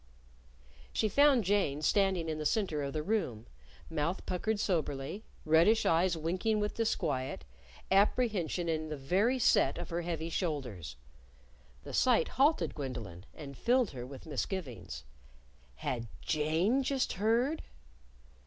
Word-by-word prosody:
She 220 - +1
found 280 +1 +5
Jane 180 -7 +1
standing 190 -2 +2
in 155 -1 -3
the - - -2
center 185 -9 0
of 140 -1 -3
the 155 - -2
room, 150 - -1 0.4
mouth 165 +3 -2
puckered 210 +4 -1
soberly, 165 -1 -2 0.2
reddish 165 +8 +4
eyes 170 +1 +3
winking 185 +7 0
with 210 0 -1
disquiet, 145 - -1 0.5
apprehension 195 -4 +2
in 155 -1 -1
the 150 - -4
very 195 - +2
set 140 - +3
of - - -6
her 170 +1 -1
heavy 165 -1 -3
shoulders. 125 - -3 0.9
The - - -8
sight 250 -3 +3
halted 290 +4 +2
Gwendolyn, 120 - -6
and 140 -2 -9
filled 245 - +2
her 125 -3 -6
with 135 0 -10
misgivings. 125 - -4 0.7
Had 115 - -3 0.2
Jane 160 - +1
just 270 0 0
heard? 235 - +1
170 Hz, 130 wpm, -32 LUFS, 145-215 Hz, 0.9 s, found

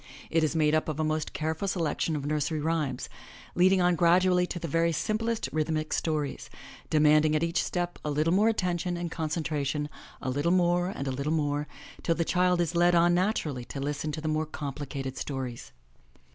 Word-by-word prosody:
It 165 -1 +3
is 155 +1 0
made 155 -1 +3
up 155 0 +1
of 155 0 -3
a - - +2
most 155 0 -1
careful 160 +5 -2
selection 165 -3 -1
of 145 -2 -3
nursery 150 +1 -1
rhymes, 150 -4 -1 0.5
leading 185 +1 +4
on 175 0 +3
gradually 180 +2 +4
to - - -5
the 170 - -4
very 165 +2 +2
simplest 220 +7 -1
rhythmic 155 0 -1
stories, 150 -3 -2 0.4
demanding 155 0 +4
at 155 - +1
each 170 0 +1
step 175 -1 -3
a 150 - -2
little 155 +3 +1
more 210 +4 +4
attention 180 -4 -1
and 170 -1 -4
concentra 155 -2 -2
tion, 145 +2 -2 0.3
a 130 - -3
little 145 +5 0
more 175 0 +2
and 140 -7 -5
a - - 0
little 140 +4 -2
more, 145 -1 0 0.3
till 165 - +1
the 170 - 0
child 180 0 +2
is 170 0 -1
led 175 +1 +4
on 170 +1 +5
natural 180 -4 +1
ly 125 - -6
to 135 - -7
listen 145 +2 -2
to 155 - -4
the 155 - -3
more 155 0 0
complicated 140 -2 -5
stories. 130 -4 -5
155 Hz, 200 wpm, -28 LUFS, 150-175 Hz, 0.5 s, on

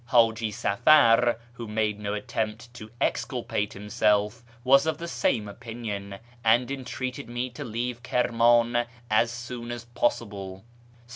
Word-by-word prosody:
Haji 115 -2 +3
Safar, 120 +2 +4 0.2
who 120 -2 -7
made 105 -1 -1
no 105 0 -3
attempt 110 +2 -4
to 110 -2 -10
exculpate 105 0 -1
himself, 105 +2 0 0.2
was 135 +4 +5
of 160 - 0
the 170 - -6
same 110 -9 0
opinion, 105 -3 -6 0.3
and 120 +3 +3
entreated 130 0 -5
me 120 +1 -3
to 125 - -7
leave 120 +1 -3
Kirman 120 -1 +3 0.2
as 110 +2 +4
soon 120 0 -7
as 120 -1 -6
possible. 100 -5 -2
115 Hz, 130 wpm, -26 LUFS, 105-120 Hz, 0.3 s, was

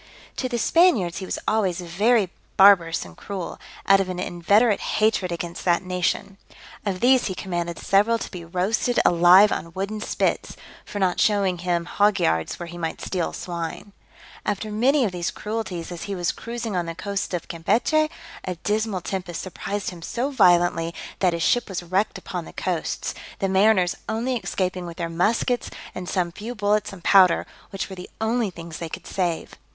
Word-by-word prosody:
To 255 - -1
the 240 - -1
Spaniards 235 - +3
he 190 - -6
was - - -2
always 195 -5 +1
very 195 +3 +2 0.3
barbarous 180 - +6
and 85 -2 -13
cruel, 190 -4 -6 0.3
out 195 0 +6
of 190 -1 -1
an 180 - -4
inveterate 200 +5 +2
hatred 215 -4 +1
against 170 0 -5
that 175 0 +3
nation. 185 +2 -2 0.5
Of 185 -2 -2
these 255 0 +4
he 190 - -3
commanded 175 -3 -3
several 210 +4 +3
to - - -6
be 180 -3 -7
roasted 190 +8 0
alive 180 +4 +7
on 165 +1 -3
wooden 200 +3 -3
spits, - - -1 0.3
for - - -7
not 185 -3 +1
showing 195 -4 +2
him 175 -1 0
hog 205 +3 +2
yards 80 0 0
where 175 - -5
he 175 +1 -9
might 165 -1 -3
steal 180 -3 -2
swine. 175 +3 -6 0.5
After 210 +1 -2
many 255 +5 +3
of 200 - -1
these 175 -1 -2
cruelties, 210 -6 -4
as 175 - -6
he 200 - -3
was 175 -2 0
cruising 235 -3 -5
on 175 -2 -1
the 165 - -5
coasts 200 +2 -3
of 170 - -5
Campechy, 245 - +1 0.3
a 185 - -3
dismal 210 +1 -1
tempest 180 -2 -4
surprised 195 +2 -4
him 175 -2 -11
so 245 +10 -2
violently, 175 -7 +3 0.2
that 180 -3 +3
his 170 -1 -1
ship 245 -2 +2
was 180 -2 -4
wrecked 185 +5 0
upon - - -5
the - - -12
coasts, - - -2 0.2
the 195 - 0
mariners 190 -1 +4 0.2
only 240 +4 -1
escaping 185 -4 -2
with 170 - -9
their 170 -1 -3
muskets 220 +8 +1 0.2
and 180 -1 -6
some 180 -3 0
few 220 +7 -7
bullets 205 0 +1
and 185 -3 -11
powder, 185 -3 +5 0.2
which 195 - -4
were 190 - -8
the 180 0 -9
only 220 0 +1
things 165 -2 -9
they 165 - -5
could - - -8
save. 175 -4 -2
190 Hz, 185 wpm, -24 LUFS, 175-215 Hz, 0.5 s, alive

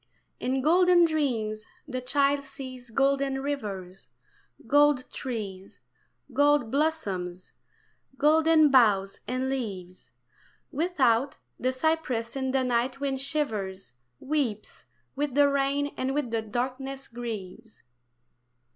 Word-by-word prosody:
In 260 +1 -1
golden 355 +2 +5
dreams 230 -9 -1 0.2
the 255 -3 -4
child 280 +2 +1
sees 260 -2 -9
golden 275 +2 +1
rivers, 195 - -5 0.6
Gold 290 +1 +4
trees, 200 -7 -6 0.5
gold 290 -5 +3
blossoms, 195 - -2 0.7
golden 310 +1 +5
boughs 205 -7 +4
and 255 +1 -1
leaves, 195 -9 -5 0.6
Without, 275 -5 +1 0.2
the 255 - +1
cypress 260 -5 -1
in 265 -1 -1
the 260 0 +1
night 250 +2 0
wind 270 -2 -2
shivers, 215 - -2 0.3
Weeps 265 -8 -3 0.3
with 285 -1 -2
the 290 0 +6
rain 280 +1 0
and 265 +1 -2
with 285 -6 -1
the 225 -1 0
darkness 260 +4 -4
grieves. 225 -3 -8
265 Hz, 105 wpm, -27 LUFS, 225-285 Hz, 0.7 s, the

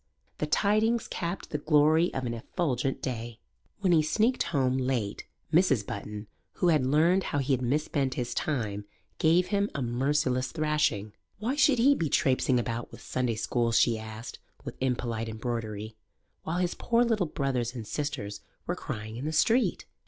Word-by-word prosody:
The 150 - -1
tidings 215 +7 +2
capped 170 +2 -4
the 150 - -1
glory 155 +3 +4
of 130 - -2
an 120 - -2
effulgent 135 +1 -2
day. 120 -2 -4 0.4
When 185 -3 +3
he 160 - +5
sneaked 220 +11 +1
home 130 -4 +1
late 125 -6 -2 0.3
Mrs. 150 - +4
Button, 105 +1 -6 0.3
who 180 - +1
had 155 -5 +3
learned 165 +7 +3
how - - -2
he 135 0 +1
had 130 - 0
misspent 135 +1 0
his 120 -1 -2
time, 110 -10 -2 0.3
gave 175 +2 +3
him 200 -1 +1
a 140 - -1
merciless 130 +1 0
thrashing. 150 -10 0 0.2
Why 230 +6 -1
should 290 -3 +4
he 265 +5 +5
be 165 - -1
trapesing 130 -1 +2
about 120 0 -3
with - - -12
Sunday 125 -3 -1
schools, 115 +1 +1
she 115 -2 +3
asked, 110 +1 -8 0.3
with - - -6
impolite 120 -3 -1
embroidery, 110 -1 -4 0.5
while 165 +2 -3
his 180 -1 0
poor 235 0 +2
little 220 -7 +1
brothers 130 -5 -2
and 115 -3 -5
sisters 125 -6 -4 0.2
were - - -1
crying 110 +1 -6
in 130 - -5
the 155 - -1
street? 230 +11 +2
135 Hz, 165 wpm, -28 LUFS, 115-165 Hz, 0.5 s, he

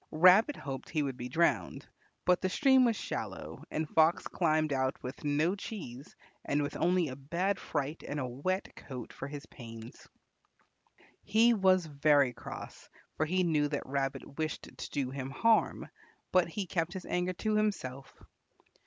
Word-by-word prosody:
Rabbit 185 - +6
hoped 135 -2 -6
he 155 -3 0
would 135 -2 -3
be 125 0 -6
drowned, 170 +6 +1 0.4
but 180 -1 +4
the 185 - +1
stream 265 +4 +5
was 230 -2 +2
shallow - - -5
and 155 0 -2
Fox 160 +2 +3
climbed 155 -3 +1
out 130 -1 0
with 125 +1 -7
no 150 +4 +2
cheese 165 - -7 0.3
and 145 0 0
with 145 - -4
only 175 -1 +2
a 130 - -6
bad 170 +9 -1
fright 145 +3 -3
and 145 - -3
a 130 - -1
wet 145 +10 -3
coat 125 -4 -8
for - - -6
his 145 0 -7
pains. 115 -2 -11 1.2
He 230 +2 +5
was 190 -4 +4
very 145 -3 +3
cross, - - -9 0.3
for 155 - 0
he 185 +3 +2
knew 155 -4 +2
that 145 -1 -3
Rabbit 135 +1 -3
wished 155 -1 -2
to - - -6
do 135 -3 -2
him 135 -1 -4
harm, 225 +11 +2 0.4
but 185 -2 +4
he 195 +3 -3
kept 170 0 -1
his 190 -2 -6
anger 180 +1 -1
to 215 +4 -1
himself. 140 -11 -1
155 Hz, 165 wpm, -31 LUFS, 140-185 Hz, 1.2 s, Rabbit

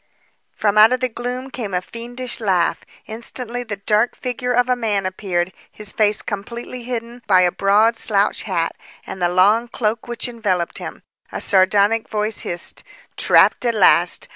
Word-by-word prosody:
From 210 0 +2
out 220 +2 +8
of 255 - 0
the 255 - 0
gloom 250 +3 -5
came 215 -8 -4
a - - +2
fiendish 245 +3 -6
laugh. 185 -6 0 0.2
Instantly, 235 +2 -5
the 220 -4 -5
dark 210 +4 +1
figure 250 0 -3
of 245 0 +2
a 250 - +2
man 210 -5 -1
appeared, 185 -2 -2 0.2
his 210 -1 -6
face 210 -1 +2
completely 235 +4 -6
hidden 240 0 -5
by 185 -2 +5
a 180 -1 +3
broad 210 +5 +3
slouch 205 -2 +1
hat 170 -5 -2 0.3
and 190 - -8
the 175 - +2
long 205 +6 +3
cloak 225 -1 -2
which 240 +1 -3
enveloped 205 -8 -2
him. - - -8 0.3
A - - -4
sardonic 200 +3 +3
voice 215 0 -1
hissed, 175 0 -4 0.3
"Trapped - - +4
at 235 -2 +1
last! 180 -3 +4
215 Hz, 165 wpm, -20 LUFS, 195-240 Hz, 0.3 s, out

